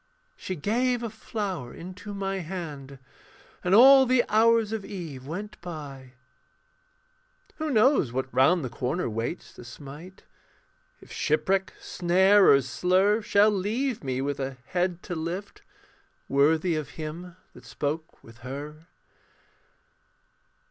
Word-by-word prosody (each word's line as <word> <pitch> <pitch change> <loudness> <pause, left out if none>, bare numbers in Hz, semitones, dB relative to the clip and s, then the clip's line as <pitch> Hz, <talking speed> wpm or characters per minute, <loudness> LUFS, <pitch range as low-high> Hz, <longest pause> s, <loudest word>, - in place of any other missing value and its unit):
She 185 - -5
gave 240 - 0
a 230 - -4
flower 200 - -5
into 185 +4 -9
my 195 -1 -3
hand, 155 -6 -7 0.7
And 180 +2 +3
all 265 +3 +8
the 250 -1 +3
hours 225 0 +4
of 220 -2 -3
eve 160 -11 -8
went 205 +6 -7
by. 140 -7 -9 1.4
Who 315 0 -3
knows 250 - +3
what 130 +1 -2
round 145 +4 +3
the - - -4
corner 140 +8 -2
waits 115 +9 -4
To - - -12
smite? 145 +9 -11 0.8
If - - -16
shipwreck, 190 +5 0
snare, 190 +3 +4
or 140 -1 +6
slur 185 - +2
Shall 210 -1 +4
leave 215 - -2
me 130 -1 -2
with 140 0 -3
a 135 -1 -4
head 180 -1 -1
to 180 - -5
lift, 170 +4 -5 0.7
Worthy 160 +5 +2
of 150 -5 -4
him 165 +3 -7 0.2
that 125 - -15
spoke 150 +7 -5
with 115 +1 -16
her. 145 +5 -8
175 Hz, 130 wpm, -26 LUFS, 140-205 Hz, 1.4 s, all